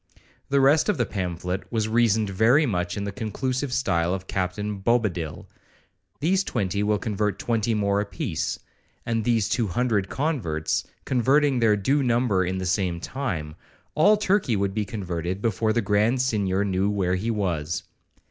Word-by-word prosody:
The 140 0 +3
rest 145 +7 +4
of 210 - +1
the - - +1
pamphlet 90 -1 -4
was 110 -2 0
reasoned 110 -2 +2
very 120 +10 +4
much 90 -5 -2
in 100 - -2
the 100 - -3
conclusive 130 +5 -3
style 90 -9 +1
of 95 0 -7
Captain 100 +2 -3
Bobadil,—these 115 - -2
twenty 100 - -1
will 105 0 +2
convert 105 -1 -1
twenty 115 -1 0
more 100 -1 +1
a - - -2
piece, 105 - -3 0.5
and 115 -1 0
these 115 -3 +2
two 115 -4 0
hundred 100 0 0
converts, 115 - -1 0.2
converting 135 +2 +3
their 110 -3 +4
due 135 +9 +1
number 120 -6 +2
in 95 +1 -2
the 95 - -3
same 90 -2 0
time, 85 - -4 0.4
all 205 +7 +5
Turkey 195 - +1
would 100 -1 0
be 105 0 -1
converted 90 -3 -4
before 110 0 0
the 115 0 +1
Grand 105 +5 +2
Signior 100 -6 +1
knew 95 0 +1
where 95 -3 0
he 95 +5 -1
was. 90 -7 -1
105 Hz, 160 wpm, -25 LUFS, 95-120 Hz, 0.5 s, all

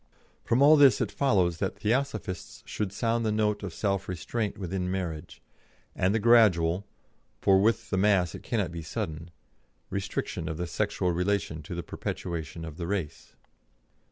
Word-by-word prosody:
From 125 +4 +3
all 155 +2 +8
this 140 -3 +6
it - - -1
follows 95 - +2
that 95 - -2
Theosophists 115 -4 -2
should 105 -3 -3
sound 115 +2 0
the 110 - +1
note 105 -1 +1
of 100 -3 -5
self 100 +1 -2
restraint 105 +4 -3
within 90 -1 -3
marriage, 90 -3 -5 0.5
and 95 - +2
the 110 - +2
gradual 100 -5 +4 0.5
for 95 -1 +4
with 115 +3 +1
the 95 - +1
mass 95 -4 +3
it - - -8
cannot 105 -8 -1
be 85 -1 -6
sudden 80 +1 -5 0.6
restriction 100 0 -3
of 80 - -4
the 90 - -2
sexual 90 +2 -1
relation 90 -2 -1
to 80 +3 -7
the 85 - -4
perpetuation 85 -1 -5
of 80 -1 -8
the 85 -2 -4
race. 90 -6 -4
95 Hz, 160 wpm, -28 LUFS, 85-105 Hz, 0.6 s, all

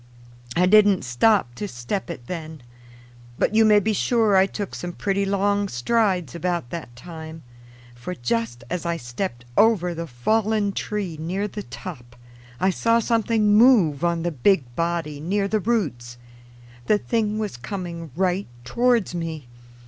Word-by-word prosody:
I 180 - +4
didn't 205 -1 +5
stop 125 - +2
to 205 - -5
step 175 +7 -4
it 130 -8 -7
then. 160 -3 -7 0.7
But - - +1
you 225 +1 +5
may 210 -1 +6
be 215 +2 0
sure 220 -1 +2
I 190 0 +5
took 200 -1 -5
some 175 0 -5
pretty 195 +2 -1
long 200 +1 +1
strides 185 - 0
about 170 -6 -2
that 160 -8 -7
time; 160 +3 -9 0.5
for 125 +10 -7
just 120 -2 -2
as 180 -1 -2
I 170 -1 -1
stepped 120 -1 -5
over 210 -6 +3
the 170 0 -5
fallen 210 - 0
tree 195 -5 -4
near 185 +6 -2
the 210 0 -6
top, 120 -12 -9 0.4
I 190 - +3
saw 230 +4 +2
something 225 -2 +2
move 210 - +5
on 170 -1 +1
the 175 - -1
big 135 -4 +1
body 165 -3 -2
near 195 +6 0
the 215 +1 0
roots. 150 - -2 0.7
The 210 - +4
thing 215 -1 -1
was 215 - -3
coming 170 +5 -6
right 185 +2 0 0.2
towards 240 - +1
me. 165 -4 -4
180 Hz, 155 wpm, -23 LUFS, 155-210 Hz, 0.7 s, may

